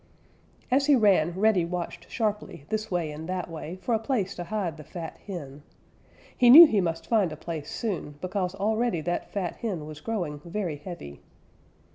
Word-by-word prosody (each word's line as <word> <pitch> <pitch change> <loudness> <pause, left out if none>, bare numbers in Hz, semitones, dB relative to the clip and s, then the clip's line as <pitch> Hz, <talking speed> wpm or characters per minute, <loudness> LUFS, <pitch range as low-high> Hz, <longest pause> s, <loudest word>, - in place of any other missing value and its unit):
As 275 +2 +3
he 290 - +7
ran, 190 -6 +3
Reddy 215 -4 +4
watched 175 0 -5
sharply 210 - -3
this 215 0 -2
way 175 -4 -1
and 155 +3 -8
that 180 -2 -3
way 165 +1 -6
for 190 +6 -2
a 220 - +2
place 220 -5 -1
to 175 - -6
hide 185 -5 -3
the 155 - -10
fat 165 +2 -8
hen. 150 -7 -7 0.7
He 245 -2 +5
knew 320 +7 +13
he 215 -10 +2
must 165 -2 -2
find 210 -7 +2
a 155 - -7
place 155 -2 -6
soon, 180 -9 -4
because 185 +1 -2
already 215 -2 0
that 175 +2 -3
fat 185 -4 -3
hen 185 -10 -3
was 155 0 -9
growing 175 -10 -3
very 170 -3 -3
heavy. 145 - -9
180 Hz, 180 wpm, -27 LUFS, 165-215 Hz, 0.7 s, knew